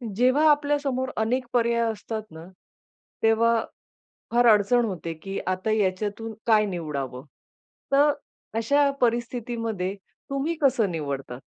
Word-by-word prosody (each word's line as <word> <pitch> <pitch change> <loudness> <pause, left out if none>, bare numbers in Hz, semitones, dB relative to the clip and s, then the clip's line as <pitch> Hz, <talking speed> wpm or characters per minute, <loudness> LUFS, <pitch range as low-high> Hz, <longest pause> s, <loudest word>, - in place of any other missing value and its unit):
जेव्हा 255 +6 +3
आपल्या 290 0 +3
समोर 260 -2 -2
अनेक 245 +4 0
पर्याय 235 -1 +2
असतात 220 +1 -5
ना, 160 +1 -10 0.8
तेव्हा 225 +1 +4 0.7
फार 240 +1 +3
अडचण 220 +3 +4
होते, 175 -6 -4
की 195 +5 -6
आता 185 +3 -1
याच्यातून 210 +2 -1
काय 215 -2 +5
निवडावं? 145 -8 -4 0.7
तर 290 +2 +5 0.5
अशा 280 +5 +3
परिस्थितीमध्ये 230 -4 -1 0.4
तुम्ही 275 +5 -1
कसं 235 -7 +3
निवडता? 140 -6 -4
225 Hz, 115 wpm, -25 LUFS, 190-250 Hz, 0.8 s, काय